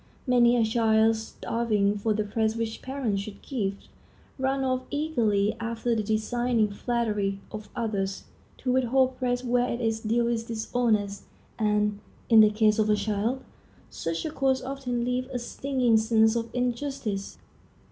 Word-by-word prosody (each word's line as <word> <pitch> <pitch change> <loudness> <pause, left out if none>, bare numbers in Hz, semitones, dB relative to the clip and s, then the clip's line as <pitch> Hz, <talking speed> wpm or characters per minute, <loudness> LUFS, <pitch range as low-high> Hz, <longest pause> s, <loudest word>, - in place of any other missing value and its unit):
Many 245 -2 +4
a 230 - +3
child, 220 0 +3
starving 220 -2 -1
for 210 +2 -1
the 215 0 +1
praise 220 +1 0
which 230 -1 -3
parents 255 -7 -2
should 200 0 -8
give, 200 -7 -2 0.6
runs 270 +1 0
off 255 0 0
eagerly 225 -9 +1
after 230 +1 -1
the 220 - +1
designing 220 +1 0
flattery 210 -3 -1
of 215 0 -7
others. 200 -5 -2 0.4
To 255 - +1
withhold 260 0 +2
praise 245 -1 0
where 245 0 +1
it 235 - -3
is 225 -2 0
due 230 +2 +1
is 230 -1 -1
dishonest, 220 -3 -1 0.3
and, 210 -1 +1 0.3
in 225 -2 +7
the 215 -1 +8
case 215 0 +2
of 215 0 +2
a 210 - +5
child, 215 +5 -1 0.5
such 165 - -3
a 315 - -2
course 265 -3 +1
often 255 -3 -3
leaves 250 +1 -1
a 255 - -2
stinging 250 -1 +1
sense 220 0 +3
of 230 0 -2
injustice. 245 -5 -3
230 Hz, 155 wpm, -27 LUFS, 215-245 Hz, 0.6 s, the